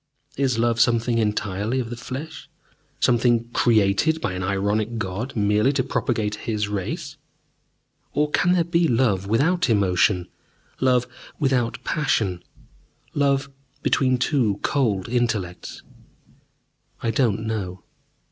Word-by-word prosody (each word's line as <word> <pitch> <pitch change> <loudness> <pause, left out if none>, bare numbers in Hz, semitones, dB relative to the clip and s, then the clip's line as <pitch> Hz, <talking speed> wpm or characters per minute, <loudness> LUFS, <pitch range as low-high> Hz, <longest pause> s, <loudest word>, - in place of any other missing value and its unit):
Is 130 -4 0
love 115 0 +1
something 120 0 +2
entirely 105 +2 -1
of 120 -2 -4
the - - -3
flesh, 130 +5 -7 0.5
something 120 -1 +2
created 115 +8 +2
by 90 - -2
an 90 - -4
ironic 100 +4 -1
God 110 +5 -4
merely 105 +4 +2
to 135 -2 +1
propagate 115 -5 -1 0.2
His 105 -2 0
race? 100 -3 -4 0.9
Or 150 0 0
can 180 +3 +3
there 175 -2 +3
be 170 0 +2
love 115 -7 +1
without 155 - +2
emotion, 95 -3 +2 0.5
love 125 -1 +3 0.3
without 130 -5 0
passion 105 -12 0 0.7
love 140 -1 +1 0.3
between 130 -2 +2
two 120 -6 +1
cold 110 -10 0
intellects? 110 -7 -2 1.2
I 115 - +1
do 115 0 +2
not 110 - -5
know. 100 -5 -4
115 Hz, 120 wpm, -23 LUFS, 105-130 Hz, 1.2 s, can